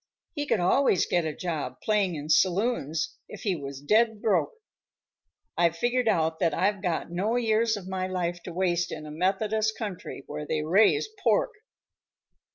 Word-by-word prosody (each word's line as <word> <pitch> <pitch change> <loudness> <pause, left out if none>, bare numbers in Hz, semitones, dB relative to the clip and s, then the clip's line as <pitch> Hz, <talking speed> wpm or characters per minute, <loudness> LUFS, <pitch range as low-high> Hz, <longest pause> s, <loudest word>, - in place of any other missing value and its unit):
He 290 -2 -3
could 215 - +2
always 185 +3 +3
get 175 -2 0
a 155 - -3
job 155 -8 -4
playing 205 -5 +1
in 150 0 -6
saloons 170 - +1
if - - -9
he 200 -5 +1
was 140 -3 -7
dead 220 +5 +3
broke. 220 - +1 1.0
I've 170 -1 +2
figured 245 +4 +1
out 160 -6 +1
that 165 -4 +1
I've 200 +1 +1
got 175 -3 -2
no 200 +7 0
years 225 -2 +2
of 190 -2 -9
my 190 -1 -2
life 175 -2 -2
to 180 - -6
waste 175 -1 0
in 155 -1 -6
a 150 - -8
Methodist 210 +6 0
country 205 -6 -6
where 150 0 -6
they 155 0 -1
raise 205 - +4
pork." - - +2
185 Hz, 165 wpm, -27 LUFS, 165-220 Hz, 1.0 s, raise